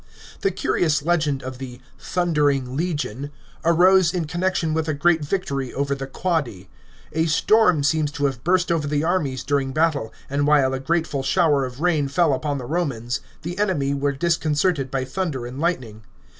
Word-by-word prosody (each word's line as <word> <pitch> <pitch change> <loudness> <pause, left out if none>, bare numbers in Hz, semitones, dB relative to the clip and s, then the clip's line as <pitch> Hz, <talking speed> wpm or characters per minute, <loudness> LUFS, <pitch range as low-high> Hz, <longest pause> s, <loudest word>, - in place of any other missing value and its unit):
The 195 - +1
curious 160 -5 0
legend 155 -5 0
of 130 0 -7
the 125 -2 -8
" 135 - -29 0.2
Thundering 145 -7 +1
Legion 145 -5 -2 0.2
" - - -28
arose 175 +1 +4
in 175 -3 -1
con 175 +3 -5
nection 180 -4 0
with 160 0 -1
a 155 - 0
great 160 +1 +2
victory 140 -6 -2
over 140 0 0
the 135 -1 -5
Quadi. 135 - -2 0.4
A 160 +1 +1
storm 180 -1 +3
seems 150 0 +1
to 145 - -1
have 135 -3 -2
burst 180 0 +2
over 160 -3 0
the 145 +1 0
armies 150 -7 0
during 135 -1 0
battle, 155 -7 +1 0.2
and 145 +1 0
while 140 -3 +4
a 135 - -2
grateful 160 -1 -1
shower 145 -2 +2
of 125 +2 -8
ram 160 -5 +1
lell 170 -5 +4
upon 145 +1 -2
the 130 - -6
Romans, 125 -6 -2 0.2
the 175 +4 -5
enemy 155 -10 +1
were 140 0 0
disconcerted 155 -1 0
by 130 -1 -2
thunder 150 -6 -3
and 125 +3 -7
lightning. 130 -10 -2
150 Hz, 185 wpm, -22 LUFS, 135-170 Hz, 0.4 s, arose